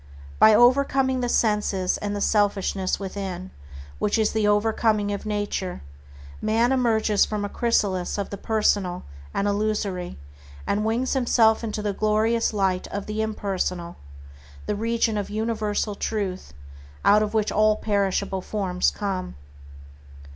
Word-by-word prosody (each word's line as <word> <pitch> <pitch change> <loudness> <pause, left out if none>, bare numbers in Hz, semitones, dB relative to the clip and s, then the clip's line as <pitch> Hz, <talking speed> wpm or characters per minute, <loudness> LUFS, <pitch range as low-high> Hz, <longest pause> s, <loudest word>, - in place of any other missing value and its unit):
By 220 -1 +7
overcoming 260 +2 +3
the 245 -1 -1
senses 210 -5 +1
and 205 0 -3
the 205 - -3
selfishness 200 -3 +1
within, 190 -2 -5 0.5
which 210 +2 +1
is 220 -1 +2
the 220 -1 +1
overcoming 210 0 +2
of 200 - -5
nature, 205 - -3 0.6
man 225 +3 +2
emerges 225 -5 +2
from 210 -1 -2
the 205 - -3
chrysalis 200 -7 0
of 200 - -4
the 200 - -5
personal 205 -5 0 0.3
and 200 - -1
illusory, 205 -3 -2 0.5
and 210 +1 0
wings 230 +4 0
himself 235 -4 +3
into 215 -1 -3
the 205 -1 -1
glorious 215 +3 +1
light 190 -3 0
of 200 0 -5
the 215 +1 -3
impersonal, 190 -5 -3 0.7
the 210 - -1
region 225 0 0
of 200 - -4
universal 215 -1 -1
Truth, 200 - -3 0.5
out 210 +1 +6
of 215 +1 -2
which 215 -1 +1
all 215 0 +3
perishable 200 -2 -1
forms 185 -3 0
come. 190 -3 -4
210 Hz, 135 wpm, -24 LUFS, 200-220 Hz, 0.7 s, By